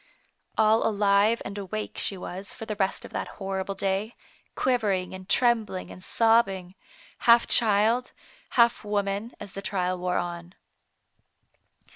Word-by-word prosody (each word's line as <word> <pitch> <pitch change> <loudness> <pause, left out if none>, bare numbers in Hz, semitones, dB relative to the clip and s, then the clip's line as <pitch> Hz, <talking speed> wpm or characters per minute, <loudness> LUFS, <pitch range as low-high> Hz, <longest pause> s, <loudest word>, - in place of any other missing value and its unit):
All 220 +1 +4
alive 205 +1 +3
and 200 +1 -5
awake 210 +2 -5
she 195 - -1
was 185 +2 -7
for 225 - -7
the 215 -1 -4
rest 195 -2 -1
of - - -11
that - - -3
horrible 195 -1 -3
day, 195 +4 -2 0.4
quivering 205 -8 0
and 185 0 -10
trembling 225 -6 +1
and 185 - -12
sob 225 +1 +4
bing, 185 -2 -7 0.5
half 235 0 +6
child, 225 +2 +3 0.5
half 235 -1 +4
woman, 205 +2 -2
as 200 - -9
the 195 - -6
trial 185 -2 -1
wore 180 0 -1
on. 175 +1 -5
200 Hz, 140 wpm, -26 LUFS, 190-225 Hz, 0.5 s, half